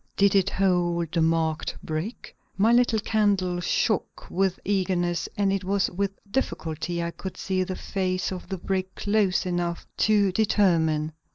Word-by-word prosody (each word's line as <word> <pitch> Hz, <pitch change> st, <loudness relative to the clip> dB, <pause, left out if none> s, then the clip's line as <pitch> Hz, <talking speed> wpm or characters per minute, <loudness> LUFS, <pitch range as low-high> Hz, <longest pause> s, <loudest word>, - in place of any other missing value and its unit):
Did 200 Hz, -1 st, +4 dB
it 195 Hz, -1 st, +3 dB
hold 175 Hz, -4 st, +1 dB
the 170 Hz, -, +1 dB
marked 160 Hz, -1 st, 0 dB
brick? 160 Hz, +9 st, -5 dB, 0.2 s
My 215 Hz, +4 st, +4 dB
little 240 Hz, -2 st, +4 dB
candle 200 Hz, -4 st, +1 dB
shook 195 Hz, +3 st, -1 dB
with 190 Hz, 0 st, +1 dB
eagerness 180 Hz, -3 st, 0 dB
and 200 Hz, -1 st, +2 dB
it 195 Hz, -1 st, -1 dB
was 195 Hz, +1 st, +1 dB
with 200 Hz, +2 st, 0 dB, 0.2 s
difficulty 170 Hz, -, -2 dB
I 170 Hz, -, -2 dB
could 190 Hz, +2 st, -7 dB
see 185 Hz, -1 st, 0 dB
the 185 Hz, 0 st, -4 dB
face 185 Hz, -1 st, -2 dB
of 180 Hz, -1 st, -7 dB
the 190 Hz, -, -3 dB
brick 190 Hz, +1 st, -3 dB
close 205 Hz, -3 st, +1 dB
enough 175 Hz, -1 st, -2 dB
to 205 Hz, -3 st, +3 dB
determine. 165 Hz, -7 st, +2 dB
185 Hz, 155 wpm, -26 LUFS, 175-200 Hz, 0.2 s, Did